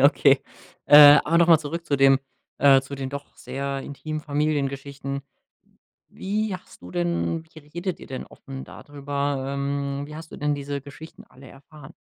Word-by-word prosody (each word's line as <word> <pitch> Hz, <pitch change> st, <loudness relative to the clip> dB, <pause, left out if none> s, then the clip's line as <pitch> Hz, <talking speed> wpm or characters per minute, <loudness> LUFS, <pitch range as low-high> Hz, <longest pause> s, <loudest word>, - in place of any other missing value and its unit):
okay. 140 Hz, -1 st, +5 dB, 0.5 s
Äh, 145 Hz, 0 st, +10 dB
aber 165 Hz, +2 st, +2 dB
nochmal 170 Hz, -1 st, +6 dB
zurück 165 Hz, +3 st, -5 dB
zu 140 Hz, -, +1 dB
den 135 Hz, -1 st, +5 dB, 0.4 s
äh, 135 Hz, -1 st, +6 dB
zu 135 Hz, +1 st, -8 dB
den 135 Hz, -1 st, -5 dB
doch 140 Hz, 0 st, -8 dB
sehr 140 Hz, 0 st, -4 dB
intimen 155 Hz, +3 st, -6 dB
Familiengeschichten. 140 Hz, -2 st, -2 dB, 0.9 s
Wie 210 Hz, +1 st, -2 dB
hast -, -, -19 dB
du 90 Hz, -, -10 dB
denn 85 Hz, -, -1 dB
wie -, -, -10 dB
redet 170 Hz, +5 st, -5 dB
ihr -, -, -11 dB
denn 130 Hz, -, -6 dB
offen 135 Hz, -1 st, -10 dB
da -, -, -12 dB
drüber? 140 Hz, -1 st, -3 dB
Ähm, 140 Hz, 0 st, -2 dB
wie 150 Hz, -, -9 dB
hast 160 Hz, 0 st, -11 dB
du -, -, -8 dB
denn 150 Hz, 0 st, 0 dB
diese 140 Hz, 0 st, -4 dB
Geschichten 145 Hz, +4 st, -12 dB
alle 130 Hz, 0 st, -16 dB
erfahren? 140 Hz, +1 st, -15 dB
140 Hz, 170 wpm, -24 LUFS, 135-150 Hz, 0.9 s, Äh